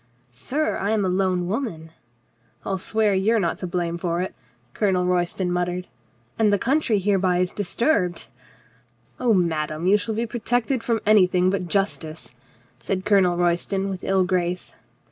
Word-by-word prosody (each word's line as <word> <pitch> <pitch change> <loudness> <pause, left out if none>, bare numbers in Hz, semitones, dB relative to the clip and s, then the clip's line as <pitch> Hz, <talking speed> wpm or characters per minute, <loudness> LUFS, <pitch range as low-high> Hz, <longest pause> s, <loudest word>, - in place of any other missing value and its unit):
"Sir, 290 - -2
I 200 - -2
am 215 -2 +1
a - - +1
lone 185 -1 0
woman 180 - -4 0.2
— 120 0 -42
" - - -35
"I'll 195 -1 -2
swear 215 +1 +1
you 195 +4 +2
are - - +3
not 170 -4 -1
to 180 - -4
blame 170 -1 -2
for 170 0 -1
it," 185 - -3 0.4
Colonel 190 -4 +1
Royston 180 0 0
muttered. 180 0 -1 0.2
" 110 +1 -38
— 120 - -34
and 215 -2 +4
the 205 - +3
country 265 0 +1
hereby 190 -2 +1
is 180 0 0
disturbed 205 - 0 0.3
— 120 +1 -33
" 120 0 -37
"Oh, 245 -2 +2
madame, 160 -2 -1
you 195 +3 +5
shall 215 +1 -3
be 230 +2 -1
protected 240 +2 -1
from 230 -2 0
any 210 -3 +6
thing 180 0 +2
but 190 -2 -2
justice," 165 -7 -2 0.5
said 185 +10 -3
Colonel 185 -4 +3
Royston 175 +3 0
with 185 - -6
ill 190 -1 +2
grace. 180 -1 -2
185 Hz, 185 wpm, -23 LUFS, 175-205 Hz, 0.5 s, any